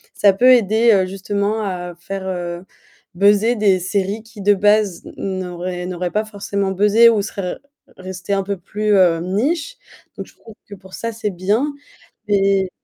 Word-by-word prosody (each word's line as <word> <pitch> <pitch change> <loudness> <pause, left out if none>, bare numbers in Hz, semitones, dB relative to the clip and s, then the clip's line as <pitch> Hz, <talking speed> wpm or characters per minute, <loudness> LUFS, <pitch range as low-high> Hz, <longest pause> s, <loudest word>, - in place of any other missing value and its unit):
ça 200 -2 +4
peut 250 +6 +5
aider, 230 0 +3
heu, 190 -2 +3
justement 200 +3 -2
à 180 -3 -4
faire, 190 +1 -6
heu, 175 -1 -4 0.5
buzzer 205 +5 +3
des 200 -3 +3
séries 195 +3 -2
qui, 225 -2 -13
de 205 +1 +4
base, 205 -2 +2
n 190 -1 -3
n'auraient 180 0 -5
n'auraient 180 -1 -4
pas 215 +1 -1
forcément 200 -2 -3
buzzé 210 +4 +5
ou 215 -3 +2
seraient 195 -2 -4
re - - -18 0.4
restées 185 +1 -5
un 195 - +1
peu 200 0 -3
plus, 210 +4 -2
heu, 175 -4 +4
niche. 280 - -1 0.4
Donc - - -6
je - - -20
trouve 225 -2 -16
que 205 - -11
pour 190 -1 -17
ça, 230 - -4
c'est 220 -1 -3
bien 205 +10 0 0.6
et 195 -2 +2
200 Hz, 180 wpm, -19 LUFS, 185-215 Hz, 0.6 s, peut